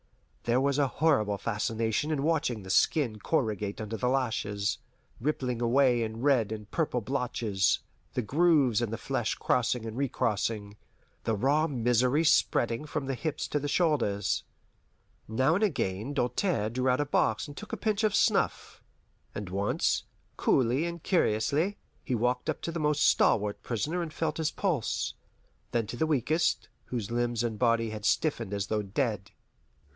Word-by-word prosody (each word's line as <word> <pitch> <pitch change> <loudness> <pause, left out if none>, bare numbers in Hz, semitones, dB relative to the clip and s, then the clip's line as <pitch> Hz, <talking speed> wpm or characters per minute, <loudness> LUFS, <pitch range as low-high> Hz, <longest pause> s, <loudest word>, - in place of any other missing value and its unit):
There 120 +2 +3
was 140 +1 +1
a 140 - +3
horrible 130 -9 +1
fascination 115 +5 -1
in 150 -3 0
watching 145 -9 0
the 95 - -5
skin 120 - +2
corrugate 105 - -1
under 110 0 -4
the 125 +2 0
lashes, 110 -5 -1 0.4
rippling 125 -3 -1
away 125 0 +3
in 110 0 -4
red 130 -6 +3
and 105 -2 -6
purple 155 -7 0
blotches, 115 -5 0 0.4
the 125 - 0
grooves 140 -3 +3
in 120 - -1
the 115 - -3
flesh - - -2
crossing 125 -1 0
and 110 0 -5
recrossing, 110 -5 -1 0.5
the 110 - 0
raw 145 +9 +2
misery 125 +2 +2
spreading 120 -4 +2
from 150 -2 -3
the 135 - -2
hips 155 +4 -3
to 145 - 0
the 145 - -3
shoulders. 135 - +1 0.8
Now 130 +7 +2
and 195 +5 +1
again 130 - -1
Doltaire 125 - 0
drew 130 +2 0
out 125 - +2
a 145 - +1
box 110 -3 +1
and 145 - -10
took 215 - -9
a - - -3
pinch 215 -1 0
of 210 -2 +2
snuff, - - +1 0.5
and 105 -1 -4
once, 100 +2 0 0.3
coolly 130 +5 +2
and 170 -1 -6
curiously, 155 - +1 0.3
he 130 - -1
walked 125 +2 0
up - - -1
to 170 - -2
the 165 - -4
most 150 -1 +2
stalwart 105 -1 +3
prisoner 150 - -2
and 165 -2 -4
felt 155 -1 -2
his 160 -1 0
pulse, 165 - -1 0.6
then 115 -2 0
to 115 - -6
the 160 +6 0
weakest, 155 +3 +1 0.2
whose 115 -3 -4
limbs 120 -1 0
and 110 -3 -3
body 115 -2 +2
had 105 -1 -6
stiffened 95 - 0
as 100 0 -2
though 110 -1 0
dead. 105 -1 -2
125 Hz, 165 wpm, -29 LUFS, 110-150 Hz, 0.8 s, There